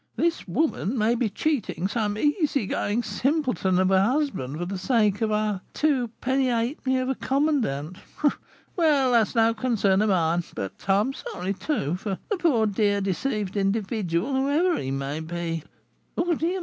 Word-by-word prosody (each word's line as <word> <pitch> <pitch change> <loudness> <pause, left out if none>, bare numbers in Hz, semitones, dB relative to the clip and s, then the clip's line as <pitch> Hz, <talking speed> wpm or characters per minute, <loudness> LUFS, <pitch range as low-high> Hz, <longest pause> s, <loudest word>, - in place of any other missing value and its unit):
this 335 -7 0
woman 245 - 0
may 220 +1 +3
be 240 -2 0
cheating 215 - -1
some 210 -1 -1
easygoing 275 - 0
simpleton 250 - 0
of 185 +1 +3
a 190 0 +5
husband 225 - 0
for 175 - -3
the 195 +2 -4
sake 210 -1 +2
of 220 -1 +1
our 210 -2 0
two 280 -6 +2
penny 265 0 +1
halfpenny 255 +2 0
of 255 0 -1
a 265 - +1
commandant! 245 - -1 0.8
Well, 295 -7 +3
that 230 -3 +4
is - - -12
no 225 0 +4
concern 215 -4 +1
of 215 - +2
mine, 170 -2 +2
but 95 - -4
I 195 +1 +4
am 265 +6 -1
sorry, 185 -6 -4
too, 185 - -2
for 195 0 -3
the 410 - +1
poor, 290 -11 +2
dear, 205 -1 +1
deceived 200 +1 -2
individual, 200 +1 0
whoever 290 +7 +2
he 130 - -3
may 135 +2 -3
be. 165 0 -4 0.5
Dear 340 0 +1
me! 345 +5 -1
215 Hz, 165 wpm, -25 LUFS, 190-270 Hz, 0.8 s, a